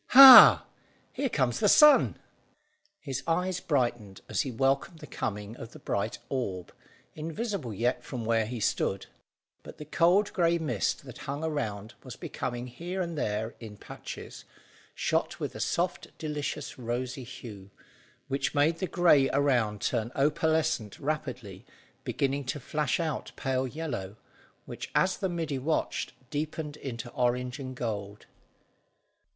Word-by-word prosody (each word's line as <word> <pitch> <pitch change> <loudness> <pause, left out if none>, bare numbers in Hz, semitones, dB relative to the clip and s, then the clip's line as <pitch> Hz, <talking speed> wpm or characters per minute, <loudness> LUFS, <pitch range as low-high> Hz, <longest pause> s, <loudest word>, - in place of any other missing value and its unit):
"Hah! 270 -2 +12 0.5
Here 275 - -1
comes 125 - 0
the - - +3
sun." 300 -1 +6 0.8
His 135 -2 -4
eyes 180 +2 0
brightened 120 - -1
as - - 0
he 140 - -3
welcomed 135 +7 0
the - - -10
coming 105 -4 -5
of 115 - -10
the - - -10
bright 110 -2 -2
orb, 100 -10 -4 0.4
invisible 165 - -4
yet 115 +5 -1
from 120 -3 -6
where 115 -1 +1
he 120 0 -5
stood; 100 -2 -1 0.6
but - - -12
the 150 - -8
cold 175 +7 +3
grey 170 -2 +2
mist 135 - -2
that - - -10
hung 145 +3 -3
around 115 -9 -3
was 130 - -9
becoming 120 -1 -5
here 170 +10 -6
and 170 -2 -2
there, 110 -5 -2
in 110 -3 -10
patches, - - -9 0.5
shot - - -1
with - - -4
a - - -8
soft 175 +1 -1
delicious 150 -3 -4
rosy 125 +2 -3
hue, 110 -5 -10 0.6
which 135 +3 -2
made 155 +3 +2
the 185 - -1
grey 165 -8 +4
around 125 -7 +1
turn 115 +2 -1
opalescent 155 -5 +1
rapidly, 125 -10 -4 0.4
beginning 140 +1 -1
to 140 +3 -3
flash 150 +2 -1
out 160 -2 -3
pale 130 -1 -1
yellow, 120 -10 -5 0.5
which, - - -7
as 190 0 +2
the 190 - -2
middy 165 -5 -3
watched, 155 +5 -2 0.2
deepened 150 0 -4
into 120 -3 -6
orange 125 +1 -1
and 130 -1 -6
gold. 105 -4 -5
135 Hz, 140 wpm, -28 LUFS, 120-160 Hz, 0.8 s, Hah